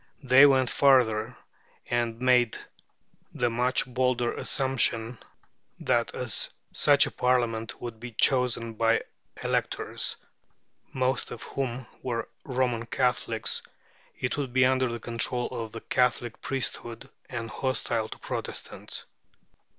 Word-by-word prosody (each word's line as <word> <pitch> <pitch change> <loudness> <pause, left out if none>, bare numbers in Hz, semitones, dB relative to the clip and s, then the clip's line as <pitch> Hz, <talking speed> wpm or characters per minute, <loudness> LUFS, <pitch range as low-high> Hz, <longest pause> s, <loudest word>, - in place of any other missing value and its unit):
They 130 +2 +8
went 130 -2 +3
farther, 125 -4 +3 0.5
and 120 -1 -1
made 125 -2 +3 0.8
the 120 -1 +1
much 125 +2 +1
bolder 125 -1 0
assumption 120 -3 0 0.6
that - - +1
as - - -1 0.2
such - - +5
a - - -5
Parliament 120 -3 0
would 115 -2 -7
be 120 0 -8
chosen 120 -1 +2
by 115 +1 +2 0.4
electors, - - 0 0.8
most 130 0 0
of - - -8
whom 130 -2 -3 0.2
were 120 -2 -2 0.2
Roman 125 -3 -1
Catholics, 120 -3 0 0.6
it 125 +1 -2
would 135 -4 -3
be 130 0 +5
under 130 0 +3
the 115 -1 -4
control 120 +2 -1
of 115 -2 -5
the 115 - -8
Catholic 120 -2 0
priesthood, 120 -2 -3 0.2
and 115 -2 -5
hostile 115 -3 -1
to - - -8
Protestants. - - -6
125 Hz, 120 wpm, -27 LUFS, 115-130 Hz, 0.8 s, They